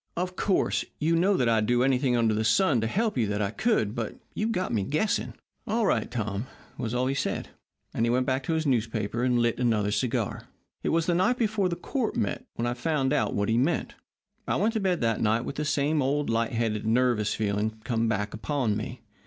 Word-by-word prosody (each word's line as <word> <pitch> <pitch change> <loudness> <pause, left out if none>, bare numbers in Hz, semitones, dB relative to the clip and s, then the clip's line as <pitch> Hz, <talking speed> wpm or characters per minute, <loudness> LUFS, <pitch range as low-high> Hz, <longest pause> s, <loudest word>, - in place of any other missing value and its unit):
'Of 180 +1 -2
course, 195 - +1
you 160 +2 +1
know 185 +3 +3
that 125 - +2
I'd 110 -2 +2
do 120 0 +3
anything 130 -1 +2
under 115 -2 +2
the 110 +1 0
sun 125 - +3
to 110 - 0
help 210 - 0
you 110 - +2
that 105 0 -1
I 100 -1 0
could. 115 - +1
But 115 -3 -4 0.2
you've 220 +2 -1
got 185 - -1
me 110 - +1
guessing.' 155 - -1 0.3
"'All 225 +1 +1
right, 120 - +1
Tom,' 110 -1 -3 0.3
was 115 +1 -3
all 125 +1 +1
he 135 - 0
said, 135 - -2 0.4
and 115 - 0
he 115 - +2
went 125 +2 +2
back 130 +1 0
to 165 - 0
his 160 0 0
newspaper 115 -3 0
and 125 -1 +2
lit 120 0 +1
another 110 -4 +1
cigar. 115 +1 -1 0.3
"It - - -1
was 165 0 +2
the 175 - +2
night 190 +8 +2
before 215 -5 +1
court 220 +8 -2
met 100 - -2
when 115 - -2
I 120 - 0
found 135 +1 0
out 150 - +1
what 100 0 0
he 115 +1 +2
meant. 145 +7 0 0.5
I - - +1
went 225 +2 +1
to 220 - 0
bed 185 -3 0
that 115 -2 +1
night 110 +2 +2
with 140 - -5
that 150 - -1
same 150 +1 +1
old, 140 -1 0
light 115 +1 0
headed, 115 -2 -1
nervous 115 -3 +2
feeling 105 +1 -1
come 115 -2 0
back 105 -1 -1
upon 120 -1 -1
me. 115 +3 -5
125 Hz, 225 wpm, -27 LUFS, 110-160 Hz, 0.5 s, know